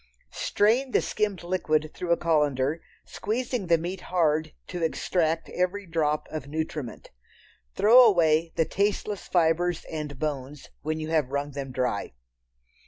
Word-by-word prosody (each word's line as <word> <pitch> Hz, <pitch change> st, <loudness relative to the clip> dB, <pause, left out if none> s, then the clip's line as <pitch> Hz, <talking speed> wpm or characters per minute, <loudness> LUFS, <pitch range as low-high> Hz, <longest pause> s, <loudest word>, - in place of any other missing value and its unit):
Strain 245 Hz, +6 st, +1 dB
the -, -, +5 dB
skimmed 205 Hz, -4 st, -1 dB
liquid 155 Hz, -4 st, 0 dB
through 175 Hz, -1 st, -4 dB
a 170 Hz, -, +4 dB
colander, 150 Hz, -2 st, +1 dB, 0.2 s
squeezing 235 Hz, -1 st, -3 dB
the 170 Hz, 0 st, +5 dB
meat 175 Hz, +3 st, -5 dB
hard 155 Hz, -3 st, +1 dB
to 175 Hz, -1 st, -6 dB
extract 165 Hz, 0 st, 0 dB
every 185 Hz, +3 st, -1 dB
drop 155 Hz, -3 st, 0 dB
of 155 Hz, -3 st, -5 dB
nutriment. 155 Hz, -4 st, -5 dB, 0.6 s
Throw 240 Hz, +5 st, +7 dB
away 165 Hz, -6 st, +4 dB
the 165 Hz, -, +2 dB
tasteless 205 Hz, +1 st, -1 dB
fibres 175 Hz, 0 st, +1 dB
and 150 Hz, -3 st, -5 dB
bones 145 Hz, -1 st, -4 dB
when 155 Hz, +1 st, -2 dB
you 155 Hz, 0 st, -4 dB
have 155 Hz, -5 st, +1 dB
wrung 140 Hz, +1 st, -2 dB
them 135 Hz, -1 st, -5 dB
dry. 125 Hz, -5 st, -2 dB
160 Hz, 140 wpm, -26 LUFS, 150-185 Hz, 0.6 s, Throw